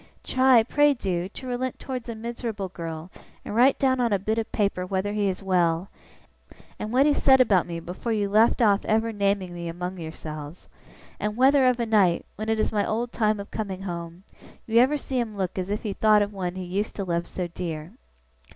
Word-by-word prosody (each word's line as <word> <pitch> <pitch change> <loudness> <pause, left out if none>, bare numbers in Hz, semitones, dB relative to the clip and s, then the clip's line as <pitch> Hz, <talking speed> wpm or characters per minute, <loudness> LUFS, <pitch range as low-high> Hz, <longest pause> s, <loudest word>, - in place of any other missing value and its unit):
Try, 255 -3 +4
pray 290 +4 +3
do, 185 -5 -2
to 260 - -10
relent 250 0 -3
towards 255 -3 -6
a 230 - -4
miserable 225 -3 -5
girl, 165 -1 -7 0.3
and - - -5
write 250 +5 +5
down 260 -1 +2
on 240 -2 +1
a 200 - +3
bit 215 +4 -1
of 225 - -4
paper 200 -4 0
whether 190 +2 -2
he 210 -1 +1
is 190 +1 -4
well, 180 -1 +1 0.9
and 215 - -4
what 260 +3 +4
he 295 - +4
said 265 -2 +5
about 200 -9 +4
me 170 -1 -4
before 180 +7 -5
you 210 -2 +1
left 220 +4 +4
off 205 -2 +3
ever 220 +1 +1
naming 200 -3 0
me 170 -1 -6
among 180 +2 -5
yourselves 155 0 -8 0.5
and 210 +1 -2
whether, 265 +1 +5
of 250 -1 +2
a 235 - 0
night, 200 -6 +3
when 215 +2 -4
it 220 0 +1
is - - +1
my 210 -2 +1
old 235 +2 -2
time 215 -2 +1
of 200 - -8
coming 195 -3 -4
home, 170 -1 -6 0.4
you 230 +1 +3
ever 265 +5 +4
see 265 -2 -3
him 220 -4 -3
look 190 -1 -2
as 185 +1 -3
if 205 +1 -2
he 210 -3 -2
thought 215 0 +4
of 205 0 -5
one 185 -2 -3
he 185 - -5
used 195 +4 -3
to 200 - -3
love 170 -2 -2
so 180 - -4
dear. 170 -2 -6
205 Hz, 215 wpm, -25 LUFS, 180-230 Hz, 0.9 s, write